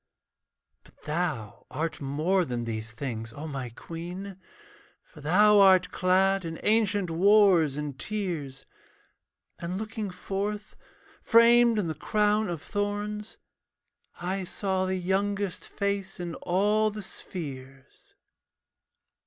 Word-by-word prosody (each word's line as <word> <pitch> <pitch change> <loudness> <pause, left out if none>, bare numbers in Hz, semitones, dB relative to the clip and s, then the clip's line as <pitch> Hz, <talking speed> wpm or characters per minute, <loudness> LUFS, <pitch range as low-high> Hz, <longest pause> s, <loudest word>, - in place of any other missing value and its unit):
But - - -23
thou 150 -9 -3
art 160 0 -3
more 155 +7 +1
than 120 -6 -3
these 110 -1 -4
things, 115 -2 -5
O 150 +5 -7
my 135 -4 -5
queen, 175 - -8 0.6
For 150 - -16
thou 205 +7 +5
art 190 -2 +6
clad 190 +1 +2
in 165 -1 -5
ancient 205 -4 +2
wars 180 -5 +5
and 145 -3 -5
tears. 170 -11 -4 0.9
And 175 +2 -4
looking 220 0 -4
forth, 200 +3 -4 0.5
framed 235 0 +6
in 205 - +1
the 160 - -2
crown 210 +6 +1
of 165 -3 -4
thorns, 205 +1 -3 0.8
I 185 +2 -2
saw 190 0 -1
the 190 - 0
youngest 195 +1 -1
face 200 -2 -2
in 175 -1 -4
all 210 +6 +1
the 210 0 -7
spheres. 135 -8 -9
185 Hz, 115 wpm, -27 LUFS, 155-205 Hz, 0.9 s, art